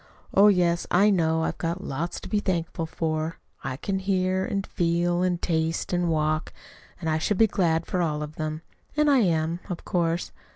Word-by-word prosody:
Oh, 200 +2 +7
yes, 175 -4 +3
I 200 +4 +5
know 160 -3 +2
I've - - -2
got 170 0 -2
lots 165 +6 -3
to - - -8
be 210 - +1
thankful 170 -4 -2
for. 160 0 -2 0.3
I 130 - -3
can 190 +5 -2
hear, 190 -1 +1
and 195 0 -2
feel, 175 +1 +1
and 180 -1 +1
taste, 165 0 -1
and 175 -1 +1
walk; 155 -1 0 0.5
and 165 - -4
I 155 0 +1
should 195 +5 0
be 225 - +6
glad 170 -6 +1
for 180 - -1
all 150 -3 -1
of 150 0 -7
them. 155 +1 -4 0.3
And 300 -1 +4
I 275 - +5
am, 165 -4 +1
of 180 - -5
course. 170 -1 0
170 Hz, 195 wpm, -26 LUFS, 160-185 Hz, 0.5 s, Oh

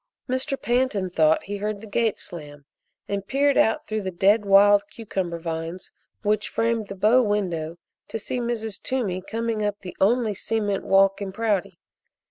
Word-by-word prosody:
Mr. 265 +2 -1
Pantin 240 -7 0
thought 160 -2 +3
he 205 +1 -5
heard 210 0 -3
the 220 - -10
gate 220 +1 0
slam 145 -4 -9 0.4
and 200 -1 -3
peered 280 +1 +2
out 220 - +2
through 215 0 -2
the 190 - -3
dead 200 +4 +3
wild 200 +1 +6
cucumber 190 -6 -4
vines 165 +2 -5 0.3
which 210 0 +1
framed 230 -2 0
the 195 - -7
bow 215 +6 +4
window 175 -7 -1 0.3
to - - -4
see 245 +3 -4
Mrs. 225 -4 -3
Toomey 210 -9 -2
coming 225 +2 -2
up 205 0 -2
the 180 - -8
only 220 +2 +3
cement 205 -1 -2
walk 195 +1 +4
in 195 -1 -3
Prouty. 205 -2 -1
205 Hz, 165 wpm, -24 LUFS, 190-225 Hz, 0.4 s, wild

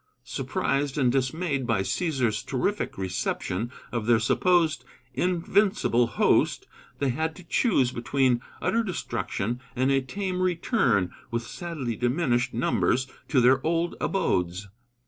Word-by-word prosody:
Surprised 140 +1 -1
and 130 -4 +3
dismayed 135 +1 -1
by 95 - +2
Cæsar's 120 - 0
terrific 195 +11 -2
reception 95 +3 -2 0.2
of 115 -2 -3
their 120 -2 +5
supposed 160 +2 +2 0.3
invincible 180 - +2
host, - - +2 0.3
they 140 - 0
had 160 +5 -1
to 185 - -12
choose 165 - +2
between 125 0 +1 0.2
utter 230 - +2
destruction 125 - -3
and 130 +2 +2
a 135 0 +3
tame 185 +6 -3
return, 170 - +1 0.2
with 115 0 -2
sadly 150 -7 -4
diminished 125 0 +1
numbers, 125 +2 +1 0.2
to 135 - +3
their 130 +2 +4
old 170 +1 0
abodes. 90 - 0
130 Hz, 125 wpm, -26 LUFS, 120-170 Hz, 0.3 s, their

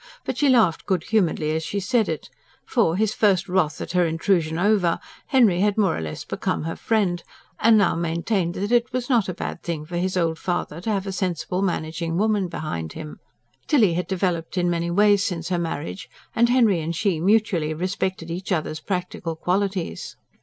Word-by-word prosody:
But - - -3
she 290 - +4
laughed 225 -10 +3
good 185 -5 +1
humouredly 175 -8 +1
as 160 - -1
she 200 - -2
said 220 +2 +1
it; 160 - -5 0.3
for, 165 - +2
his 215 +2 +1
first 195 -4 +2
wrath 180 -4 +1
at - - -5
her 180 0 +3
intrusion 165 -1 +1
over, 190 -2 +2 0.3
Henry 230 -10 +4
had 205 +1 +2
more 195 -6 +3
or - - -4
less 80 -1 -6
become - - -2
her 165 +1 -3
friend; 195 -6 0 0.4
and 225 0 +6
now 200 -4 +3
maintained 170 +2 -1
that 205 +4 -2
it 240 0 +3
was 250 +1 -2
not 230 -6 +3
a - - -2
bad - - -5
thing 160 -3 -4
for 175 +2 -5
his 185 +1 -1
old 165 -2 0
father 175 -2 -3
to 220 - -3
have 200 -2 0
a 195 - -3
sensible, 185 -1 -2
managing 165 -2 -2
woman 210 -2 +1
behind 85 - -5
him. 155 -1 -8 0.5
Tilly 225 - +4
had 180 +2 -2
developed 180 -2 -1
in 175 -1 +2
many 170 0 -1
ways 205 +2 +4
since 170 -2 -3
her 180 -2 0
marriage; 145 - -4 0.3
and 235 +1 +4
Henry 230 -8 +4
and 165 +2 -3
she 185 -2 0
mutually 185 -4 +2
respected 185 0 -2
each 180 +3 -5
other's 155 -2 -1
practical 180 -2 -3
qualities. 185 - -2
180 Hz, 195 wpm, -23 LUFS, 165-205 Hz, 0.5 s, and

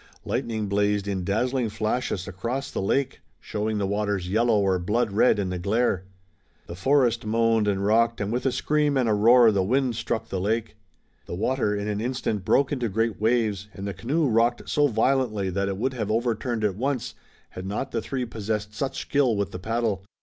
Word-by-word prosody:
Lightning 110 -2 -2
blazed 100 0 +1
in 95 -2 -2
dazzling 120 +5 0
flashes 110 -3 -2
across 120 +8 -4
the - - -3
lake, 135 +7 0 0.2
showing 110 +5 -3
the 100 - 0
waters 100 -2 -1
yellow 110 +2 +2
or 95 -2 +2
blood 105 +5 0
red 105 +4 +4
in 100 -2 -1
the 90 -1 -3
glare. 100 0 0 0.6
The - - -8
forest 120 +3 +2
moaned 115 0 +2
and 100 -1 0
rocked, 115 +2 +3
and 100 0 -2
with 125 +2 0
a - - +2
scream 150 +1 +1
and 125 -3 +2
a 110 - +3
roar 115 +2 +6
the 100 -2 +1
wind 125 +5 +1
struck 115 0 -3
the 95 - -2
lake. 110 +2 -1 0.5
The - - -4
water, 110 +1 0
in 100 0 -3
an 105 0 -2
instant, 120 -4 -2
broke 135 +9 +2
into 125 -5 -1
great 110 +1 -1
waves, 110 -3 +1
and 95 - -6
the 100 - -3
canoe 145 +9 0
rocked 120 +1 +1
so 145 0 +3
violently 115 -5 +1
that 100 +2 -1
it 95 -1 -2
would 130 +5 -1
have 110 -5 -3
overturned 115 0 -1
at 105 -2 +2
once 125 +1 -2 0.4
had 95 +1 -7
not 110 +7 -3
the 115 - -1
three 130 +2 -3
possessed 105 -1 -4
such 135 +5 -3
skill 135 -5 +1
with 100 -3 -2
the 90 - -6
paddle. 110 -1 -1
110 Hz, 200 wpm, -25 LUFS, 100-120 Hz, 0.6 s, roar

